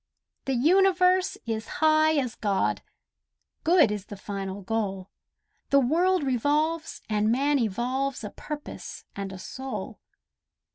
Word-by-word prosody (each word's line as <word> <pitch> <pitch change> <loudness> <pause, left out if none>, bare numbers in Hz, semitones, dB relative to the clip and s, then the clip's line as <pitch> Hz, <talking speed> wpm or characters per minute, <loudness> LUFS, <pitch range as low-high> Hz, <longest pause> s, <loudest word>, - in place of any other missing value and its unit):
The 270 - 0
universe 365 +5 +4
is 225 -1 -3
high 310 0 +4
as 255 -6 0
God! 200 -2 0 0.8
Good 325 - +5
is 205 -2 -4
the 205 - -8
final 195 0 -5
goal; 195 -2 -3 0.6
The 280 - +5
world 340 +7 +2
revolves 300 +5 0
and 215 0 +1
man 280 +3 +2
evolves 250 +5 -1
A 210 - -5
purpose 300 -1 -8
and 195 -1 -4
a 190 - -7
soul. 265 +7 -6
260 Hz, 125 wpm, -27 LUFS, 210-310 Hz, 0.8 s, Good